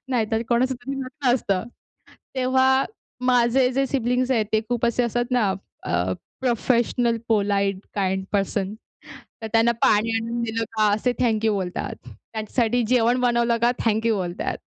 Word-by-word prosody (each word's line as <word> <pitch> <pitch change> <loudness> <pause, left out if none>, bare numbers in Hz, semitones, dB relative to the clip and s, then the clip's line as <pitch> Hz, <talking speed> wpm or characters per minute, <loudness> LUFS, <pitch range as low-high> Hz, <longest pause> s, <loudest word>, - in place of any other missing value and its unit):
नाहीतर 225 -3 0
कोणाचं 255 +2 +2
तरी 245 +3 -6
लग्न 265 -1 0
असतं. 195 -6 -1 0.7
तेव्हा 260 +1 +3 0.4
माझे 250 +1 +4
जे 270 +1 +1
सिबलिंग 250 -1 0
आहेत. 225 -4 +2
ते 220 - +3
खूप 240 -1 0
असे 235 +1 +1
असतात 240 0 0
ना 225 -6 +2 0.3
आह, 90 +1 0 0.3
प्रोफेशनल 240 -1 +1
पोलाईट 200 -3 +1 0.2
काइंड 190 -1 0
पर्सन, 195 -1 0 0.7
तर - - -3
त्यांना 230 +1 +4
पाणी 215 +2 +4
आणून 230 +1 -2
दिलं 225 0 -1
का 215 -1 +4
असे 245 +4 0
थँक 225 -3 +1
यू 220 - +3
बोलतात. 185 -3 -3
त्यांच्यासाठी 230 +2 -2
जेवण 245 0 +3
बनवलं 235 -1 +2
का 240 - +5
थँक 225 0 +1
यू 225 - +3
बोलतात. 180 -2 -3
235 Hz, 150 wpm, -23 LUFS, 215-250 Hz, 0.7 s, का